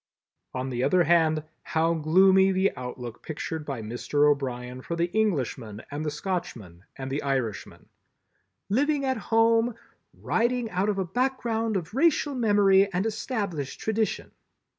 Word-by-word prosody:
On 130 +1 -3
the 120 0 -1
other 180 +3 +4
hand, 160 -2 +3 0.2
how 165 +1 +1
gloomy 190 +4 +4
the 190 +1 +1
outlook 125 -2 -7
pictured 160 0 -5
by 130 -6 -4
Mr. 120 +6 +1
O'Brien 130 -3 -1
for 170 - -4
the 170 +1 -1
Englishman 130 - -1
and 145 +2 -4
the 155 - -1
Scotchman 135 - -5
and 135 0 -6
the 140 - -1
Irishman! 130 -7 -3 0.8
"Living 280 +6 +1
at 260 -1 0
home—writing 230 +1 0
out 185 +3 0
of 205 - 0
a 190 - 0
background 230 -1 -1
of 175 +1 -6
racial 295 +1 +2
memory 200 -5 +4
and 185 +2 -1
established 205 - -3
tradition." 220 0 -1
180 Hz, 140 wpm, -26 LUFS, 140-220 Hz, 0.8 s, other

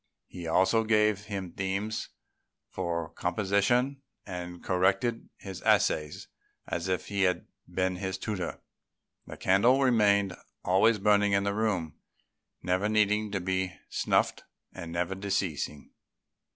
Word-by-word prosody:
He 85 -2 -8
also 95 +7 +3
gave 105 -2 +2
him 100 -4 -5
themes 100 +4 -3 0.6
for 85 -3 -2
composition, 105 +8 +1 0.2
and 90 -2 -7
corrected 95 +6 +1
his 95 -2 -8
essays 75 -1 +1 0.4
as 85 +1 -3
if 95 -1 -1
he 100 -1 -2
had 90 -2 +2 0.3
been 95 -1 0
his 95 0 -3
tutor. 100 -5 -4 0.7
The - - -8
candle 115 +8 +4
remained 100 -7 +3 0.3
always 100 +5 +4
burning 105 0 +3
in 100 0 +3
the 100 0 0
room, 100 -8 -1 0.7
never 90 +4 +1
needing 105 0 +2
to 95 - 0
be 95 0 -1 0.2
snuffed - - +1 0.3
and 85 -1 -7
never 85 +2 -1
decreasing. 95 -7 -3
95 Hz, 125 wpm, -29 LUFS, 90-105 Hz, 0.7 s, candle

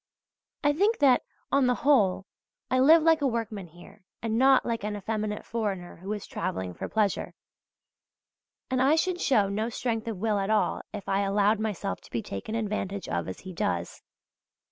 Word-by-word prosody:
I 290 0 +4
think 410 +8 +2
that, 270 -4 +5 0.3
on 275 -2 +4
the 250 - +3
whole, 200 -10 +4 0.5
I 255 - +3
live 310 +5 +7
like 325 -1 +4
a 280 - +3
workman 225 -6 -3
here 175 +3 -16 0.2
and 225 -1 -2
not 265 +2 +5
like 230 -3 -2
an 210 0 -2
effeminate 210 +1 -3
foreigner 200 -6 -3
who 190 +4 -7
is 210 - -6
travelling 95 -1 -4
for - - -6
pleasure; 210 -3 0 1.4
and 255 -1 +1
I 275 +4 +5
should 355 +2 0
show 215 -8 +3
no 215 +3 -1
strength 230 -1 -2
of 225 -4 -3
will 210 +1 0
at 195 +1 -2
all 215 -1 +1
if 205 -2 -7
I 195 +1 +1
allowed 200 +2 +2
myself 210 - -3
to - - -17
be 115 - -3
taken 100 - -5
advantage 200 -3 -3
of 85 -1 -2
as 95 - -7
he 185 -1 -8
does. 85 - -2
215 Hz, 185 wpm, -27 LUFS, 195-255 Hz, 1.4 s, live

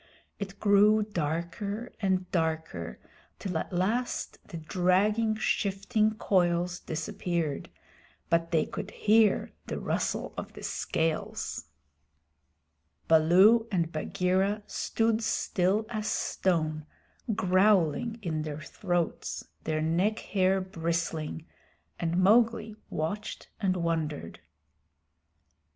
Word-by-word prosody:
It 200 -1 -6
grew 210 +1 +5
darker 200 +5 -3
and 190 -2 +1
darker, 160 - -2 0.4
till 185 -3 -4
at - - -5
last 210 +8 -1
the 175 - -7
dragging, 195 +7 +2
shifting 215 +1 +1
coils 175 -3 +1
disappeared, 160 -1 -3 0.6
but 165 0 +1
they 160 -2 +2
could - - -6
hear 215 -1 +3 0.2
the - - -3
rustle - - -2
of - - -6
the - - -10
scales. 160 -1 -2 1.4
Baloo 185 +9 +6
and 170 -4 0
Bagheera 185 +6 0
stood 225 0 0
still 205 -1 +1
as 215 -2 -3
stone, 155 -7 0 0.5
growling 190 +3 +3
in 160 -4 -1
their 155 -1 -5
throats, 175 +1 -2 0.2
their 155 0 0
neck 180 +7 +1
hair 190 -2 +1
bristling, 165 -3 -3 0.5
and 170 0 0
Mowgli 220 +2 +3
watched 200 +7 -4
and 185 -3 +1
wondered. 160 - -2
185 Hz, 100 wpm, -29 LUFS, 165-210 Hz, 1.4 s, Baloo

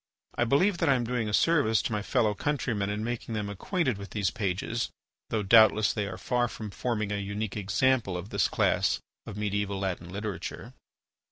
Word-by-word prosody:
I 120 - +1
believe 175 - +3
that - - +2
I 135 - +5
am 125 - 0
doing 115 -2 -1
a - - -3
service 130 -3 +3
to - - -2
my 105 -1 -1
fellow 110 -1 +1
countrymen 115 -5 -1
in 105 +1 -2
making 120 -1 -3
them 105 -1 -2
acquainted 130 - -1
with 100 - -8
these 100 -4 0
pages, 105 +2 -2 0.4
though 110 -2 0
doubtless 110 0 +6
they 105 -2 -2
are 95 - -6
far 125 -1 0
from 110 -2 -7
forming 110 -2 -2
a 105 - -1
unique 100 +1 -3
example 105 0 +1
of 90 +3 -7
this - - +2
class - - +1 0.3
of 100 - -7
mediaeval 105 -1 -1
Latin 95 -3 -3
literature. 100 +1 -5
105 Hz, 190 wpm, -28 LUFS, 100-120 Hz, 0.4 s, doubtless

